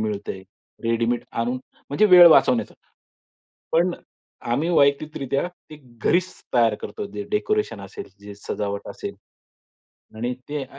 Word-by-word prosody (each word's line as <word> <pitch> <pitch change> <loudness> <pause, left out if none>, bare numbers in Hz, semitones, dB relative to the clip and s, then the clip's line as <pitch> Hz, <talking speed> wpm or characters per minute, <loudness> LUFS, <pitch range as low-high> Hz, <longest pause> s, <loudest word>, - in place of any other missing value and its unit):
मिळतंय, 105 -3 -4 0.4
रेडीमेड 115 +1 0
आणून 120 +2 -1 0.3
म्हणजे 145 +10 +3
वेळ 180 -3 +9
वाचवण्याचा. 240 +8 +4 1.0
पण - - +3
अ, - - -15 0.5
आम्ही 160 +4 0
वैयक्तिकरित्या 140 -2 +1 0.2
ते 155 - -9 0.3
घरीच 185 +1 +2 0.2
तयार 115 -3 +4
करतो 105 - -5
जे 105 0 -4
डेकोरेशन 425 - 0
असेल, 410 -3 -8 0.2
जे 100 0 -10
सजावट 100 0 -4
असेल - - -6 1.0
आणि 120 +3 -2 0.2
ते 145 -1 -3
135 Hz, 120 wpm, -23 LUFS, 110-175 Hz, 1.0 s, वेळ